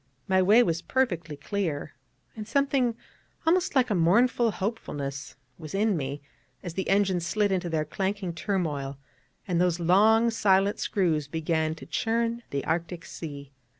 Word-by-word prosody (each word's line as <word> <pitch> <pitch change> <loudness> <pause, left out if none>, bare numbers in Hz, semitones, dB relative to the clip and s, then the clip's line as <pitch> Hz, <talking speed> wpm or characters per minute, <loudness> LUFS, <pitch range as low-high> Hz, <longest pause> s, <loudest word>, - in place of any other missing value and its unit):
my 190 0 +3
way 210 +6 +6
was 165 -6 -1
perfectly 175 - -1
clear; 155 -3 -3 0.4
and 215 -2 -7
something 270 -2 +1 0.5
almost 350 0 +2
like 250 -3 +3
a - - +3
mournful 230 +7 +3
hopefulness 150 -10 -4 0.2
was 155 +1 -7
in 210 0 +2
me 140 -1 -4 0.4
as 175 - -5
the 190 +2 -3
engines 195 -3 +2
slid 205 +4 +1
into 180 -2 -1
their 155 -2 0
clanking 190 +2 -2
turmoil, 155 -6 -2 0.5
and 175 -2 +1
those 180 -1 +1
long 215 +7 +4
silent 200 -2 +2
screws 160 -7 0
began 160 0 -1
to - - -11
churn 230 +1 -1
the 140 -1 -3
Arctic 170 +1 -2
sea. 140 -4 -8
185 Hz, 150 wpm, -27 LUFS, 160-215 Hz, 0.5 s, way